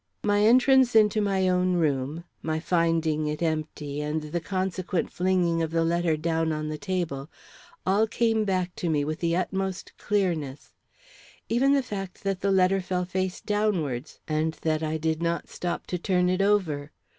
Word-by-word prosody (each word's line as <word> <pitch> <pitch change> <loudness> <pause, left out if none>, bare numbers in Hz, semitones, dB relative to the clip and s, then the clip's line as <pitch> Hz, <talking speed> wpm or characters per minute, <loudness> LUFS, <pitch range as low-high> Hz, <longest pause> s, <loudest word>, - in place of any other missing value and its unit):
My 205 0 +2
entrance 255 +2 +5
into 215 -1 +5
my 195 -2 +1
own 180 0 +2
room, 150 -1 0 0.2
my 160 0 -1
finding 165 -2 +1
it 150 +2 -2
empty, 155 -2 -2
and 150 +1 -2
the 155 +3 -3
consequent 185 -1 -2
flinging 180 -2 +1
of 160 - -1
the 165 0 +1
letter 170 -1 +1
down 160 0 0
on 155 0 -3
the 155 - -4
table, 170 -8 -3 0.6
all 200 +4 +3
came 225 -1 +1
back 185 -3 -1
to 175 - -2
me 145 -2 +1
with 155 +1 -3
the 170 -1 +1
utmost 190 +1 -3
clearness; 165 -9 -1 0.8
even 265 +4 +3
the 275 -1 +2
fact 195 -6 -6
that 195 -2 -1
the 200 - 0
letter 190 0 +3
fell 180 0 -2
face 185 0 -2
downwards 175 - -1
and 155 +1 0
that 155 -1 +1
I 160 0 -1
did 160 +1 -1
not 170 0 -1
stop 175 -1 -4
to 180 - -3
turn 180 0 +1
it 185 +1 +1
over. 175 -8 +1
175 Hz, 170 wpm, -26 LUFS, 155-195 Hz, 0.8 s, entrance